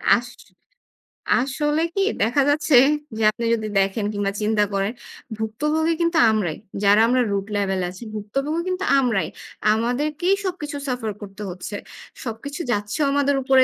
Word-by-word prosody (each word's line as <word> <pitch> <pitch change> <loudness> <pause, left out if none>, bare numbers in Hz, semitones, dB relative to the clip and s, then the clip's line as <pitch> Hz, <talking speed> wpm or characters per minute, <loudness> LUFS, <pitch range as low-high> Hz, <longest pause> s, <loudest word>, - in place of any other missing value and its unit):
আস 245 +1 -3 1.1
আসলে 295 +4 0
কি 390 - +1 0.2
দেখা 240 +6 +3
যাচ্ছে 295 -1 +3 0.4
যে - - -3
আপনি 235 +1 -4
যদি 215 -2 -1
দেখেন 195 +2 0
কিংবা 200 -1 -1
চিন্তা 210 0 +2
করেন, 195 +1 0 0.5
ভুক্তভোগী 300 +10 0
কিন্তু 335 0 +2
আমরাই। 185 -8 -1 0.3
যারা 205 +2 +6
আমরা 250 +1 +3
root 200 -1 -1
level 195 -2 0
এ 175 - -1
আছি, 185 +5 -10
ভুক্তভোগী 275 +10 -2
কিন্তু 370 +1 -2 0.2
আমরাই। 225 -10 +1 0.5
আমাদেরকেই 295 - 0
সবকিছু 310 -5 -4
suffer 245 -4 -2
করতে 200 0 -9
হচ্ছে। 180 +3 -6 0.5
সবকিছু 275 +7 -5
যাচ্ছেও 210 +7 0
আমাদের 285 0 +2
উপরে, 265 0 +5
235 Hz, 145 wpm, -22 LUFS, 205-295 Hz, 1.1 s, যারা